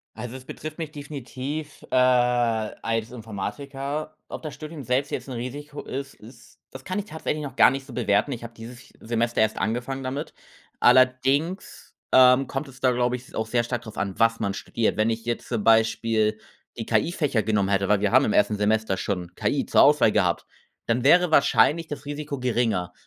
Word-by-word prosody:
Also, 125 +1 -6
es 130 - -12
betrifft 155 +4 -8
mich 160 -3 -4
definitiv, 145 +1 -6
äh, - - -2
als 120 -3 +1
Informatiker. 135 +7 -5
Ob - - -7
das 155 -3 -6
Studium 155 -1 -8
selbst 130 +3 0
jetzt - - -4
'n 130 - -5
Risiko 145 +5 -6
ist 135 +1 -6
ist, 115 +5 -17
das 130 0 -10
kann 185 +2 -3
ich 205 - -2
tatsächlich 155 -3 -4
noch 135 -2 -7
gar - - +7
nicht 135 0 -5
so 135 - -11
bewerten. 120 +2 +1
Ich 120 - -5
habe 115 0 -9
dieses 120 +3 -11
Semester 115 +1 -1
erst 110 0 +2
angefangen 120 +6 -2
damit. 135 +4 -5 0.5
Allerdings, 135 +8 +2 0.2
ähm, 130 +1 +6
kommt 135 +2 -3
es 135 0 -15
da, 130 - +3
glaube 125 0 +1
ich, 125 +1 -15
auch 110 - -1
sehr 120 +1 +1
stark 120 0 -3
drauf 110 -2 -11
an, 95 0 -3
was 115 0 +3
man 100 - 0
studiert. 115 +3 -1
Wenn 110 +1 +2
ich 115 0 -3
jetzt 120 0 -3
zum 115 -4 -2
Beispiel 110 -1 +2 0.4
die 115 - -5
KI-Fächer 130 +1 +1
genommen 105 -2 +1
hätte, 100 -1 +1
weil 105 -1 +3
wir 105 -1 +1
haben 130 +3 +6
im 105 - 0
1. 105 +1 +3
Semester 105 -1 +1
schon 90 -2 -4
KI - - 0
zur - - +5
Auswahl - - +5
gehabt, - - +1 0.4
dann 120 +2 0
wäre 175 +4 +5
wahrscheinlich 155 +2 +4
das 145 0 -7
Risiko 145 -1 -5
geringer. 115 -8 0
125 Hz, 195 wpm, -25 LUFS, 110-140 Hz, 0.5 s, gar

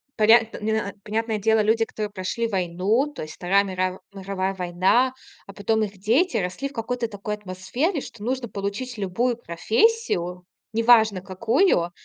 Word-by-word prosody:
поря 225 +2 +7 0.2
не 220 - -1
на 220 -2 -1
понятное 220 +1 -1
дело, 220 +2 +2
люди, 225 +2 +3
которые 215 -1 -5
прошли 205 +4 -2
войну, 190 +5 +1
то - - -7
есть 155 - -8
Вторая 195 +3 +2
мирав 185 -1 -2
мировая 195 -1 -3
война, 185 +8 +2 0.3
а 195 - -11
потом 220 +2 0
их 200 -1 -5
дети 235 - +2
росли 190 +9 -2
в - - -17
какой-то 235 0 -2
такой 205 0 -5
атмосфере, 210 - -2
что 230 -5 -10
нужно 255 +1 -2
получить 210 +5 -4
любую 220 +5 0
профессию, 180 - 0 0.3
не 230 - +1
важно 220 -5 +5
какую- 200 - +1
210 Hz, 160 wpm, -24 LUFS, 185-235 Hz, 0.3 s, поря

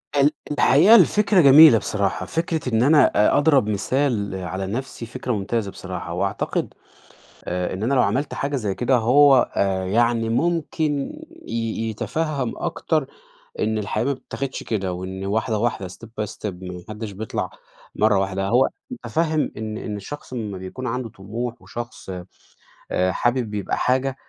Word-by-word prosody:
ال 145 +1 +4 0.2
الحقيقة 150 - +6
الفكرة 205 0 +5
جميلة 145 -2 +9
بصراحة، 100 -2 -1
فكرة 160 -4 -2
إن 110 +2 +3
أنا 150 +2 +6
أ 105 - +3
أضرب 140 -7 +3
مثال 105 -1 0
على 95 +1 -4
نفسي 120 +2 -5
فكرة 125 +2 -5
ممتازة 105 0 -2
بصراحة، 90 -2 -6
وأعتقد 100 +3 -2 0.7
آآ 90 0 -2
إن 95 +3 -4
أنا 130 +4 +1
لو 130 - +4
عملت 140 +4 0
حاجة 140 +1 -2
زي 105 -7 -2
كده 125 +1 +2
هو 135 +4 +6 0.2
آآ 95 -1 0
يعني 115 +2 +1
ممكن 155 +1 -1 0.3
ي 115 0 -2
يتفَهَم 140 +3 -2
أكتر 155 -5 -1 0.5
إن 110 0 0
الحياة 105 +2 -2
ما 140 - +1
بتتاخدش 135 0 -5
كده، 95 -5 -2
وإن 95 +2 -6
واحدة 110 +2 0
واحدة 110 -5 -1
step 105 +5 -12
by - - 0
step، - - -23 0.2
ما 90 -1 -7
حدش 105 -1 -6
بيطلع 110 +3 -4 0.5
مرة 105 -2 +3
واحدة، 95 0 -1
يعني 95 - -2
هو 130 +2 +5 0.2
متفهم 160 -10 -1
إن 110 0 -5
إن 105 -2 -5
الشخص 130 +7 -9
لما 105 -5 -4
بيكون 95 +8 -7
عنده 125 0 -3
طموح، 115 +5 -6
وشخص 120 -4 -8 0.8
آآ 90 0 +1
حابب 120 -1 0
يبقى 105 -2 -2
حاجة 130 +1 +1
115 Hz, 155 wpm, -22 LUFS, 100-135 Hz, 0.8 s, جميلة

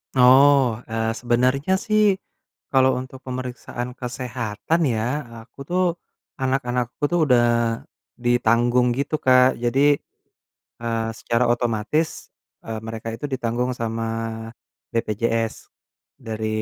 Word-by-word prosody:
Oh, 130 -1 +6
eee, 110 0 -1
sebenernya 125 +7 +1
sih 215 0 +3 0.7
kalo 130 -1 +5
untuk 130 +1 -8
pemeriksaan 125 -1 -5
kesehatan 125 +4 -2
ya, 110 -1 -1 0.4
aku 115 +4 -20
tuh, 180 +1 +2 0.6
anak-anakku 125 -2 -1
tuh 175 - +2
udah 125 -4 +4 0.8
ditanggung 120 +1 +3
gitu 140 +3 -1
Kak. 130 0 +5
Jadi, 140 +4 +4 0.8
eee, 115 -1 -1
secara 120 +1 +1
otomatis, 120 +7 0 0.6
eee, 110 -1 -4
mereka 110 0 -6
itu 145 - -6
ditanggung 125 0 -1
sama 115 0 -2 0.9
BPJS, 115 0 0 0.7
dari 110 -1 -3
125 Hz, 100 wpm, -23 LUFS, 115-130 Hz, 0.9 s, Oh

